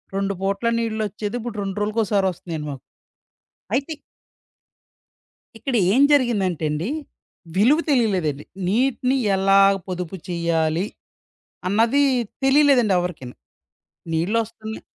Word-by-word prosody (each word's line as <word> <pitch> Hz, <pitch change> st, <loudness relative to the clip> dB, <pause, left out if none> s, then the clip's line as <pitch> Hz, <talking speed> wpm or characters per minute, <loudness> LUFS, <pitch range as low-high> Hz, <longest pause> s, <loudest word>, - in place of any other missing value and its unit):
2 195 Hz, 0 st, 0 dB
పూట్ల 200 Hz, +4 st, -1 dB
నీళ్ళొచ్చేది. 215 Hz, -1 st, -3 dB
ఇప్పుడు 235 Hz, -1 st, -6 dB
రెండ్రోజులకోసారి 205 Hz, 0 st, 0 dB
ఒస్తున్నాయండి 160 Hz, -3 st, -6 dB
మాకు. 135 Hz, -2 st, -9 dB, 0.9 s
అయితే 280 Hz, +4 st, -1 dB, 1.7 s
ఇక్కడ 260 Hz, +2 st, -3 dB, 0.2 s
ఏం 265 Hz, -, +4 dB
జరిగిందంటేండి, 185 Hz, -, +1 dB, 0.7 s
విలువ 255 Hz, +11 st, +4 dB
తెలియలేదండి. 185 Hz, -, +1 dB, 0.2 s
నీటిని 250 Hz, +4 st, +1 dB, 0.2 s
ఎలా 195 Hz, +1 st, +4 dB, 0.3 s
పొదుపు 180 Hz, -1 st, -4 dB
చెయ్యాలి 170 Hz, 0 st, 0 dB, 0.8 s
అన్నది 230 Hz, +8 st, +3 dB, 0.4 s
తెలియలేదండి 270 Hz, -7 st, +4 dB
ఎవరికీను. 155 Hz, -9 st, -5 dB, 0.8 s
నీళ్ళొస్తున్నాయి 220 Hz, +5 st, -2 dB
205 Hz, 85 wpm, -22 LUFS, 180-235 Hz, 1.7 s, ఏం